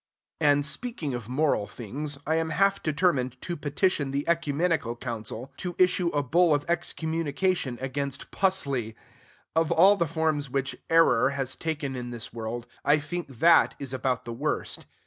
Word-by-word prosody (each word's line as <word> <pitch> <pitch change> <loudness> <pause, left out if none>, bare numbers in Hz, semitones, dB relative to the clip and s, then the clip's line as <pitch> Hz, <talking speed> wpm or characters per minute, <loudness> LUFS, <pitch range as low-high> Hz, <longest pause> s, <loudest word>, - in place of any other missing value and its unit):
And, 145 -1 +3
speaking 155 - -2
of 120 -2 -5
moral 130 -6 +1
things, 140 +6 -5
I 160 +1 +1
am 165 0 0
half 195 +5 +2
determined 145 -6 +1
to 175 - -4
petition 145 0 0
the 140 +1 -2
Ecumenical 160 -5 +1
Council 120 +1 -6
to 180 -2 -5
issue 180 -1 +3
a 145 -3 0
bull 165 +3 +4
of 145 - -2
excommunication 165 -3 -1
against 140 +1 -4
"pusley." 140 - 0 0.6
Of 165 -1 +2
all 190 +5 +6
the 170 - +1
forms 155 -3 0
which 135 +1 -2
"error" 165 -7 +5
has 130 -1 -2
taken 150 -4 -3
in 120 -1 -5
this 120 -2 -7
world, 115 +1 -5 0.2
I 145 - +5
think 170 +3 -4
that 140 +6 +4
is 135 -2 -5
about 130 -1 -1
the 120 - -5
worst. 145 +6 -3
145 Hz, 160 wpm, -27 LUFS, 130-165 Hz, 0.6 s, all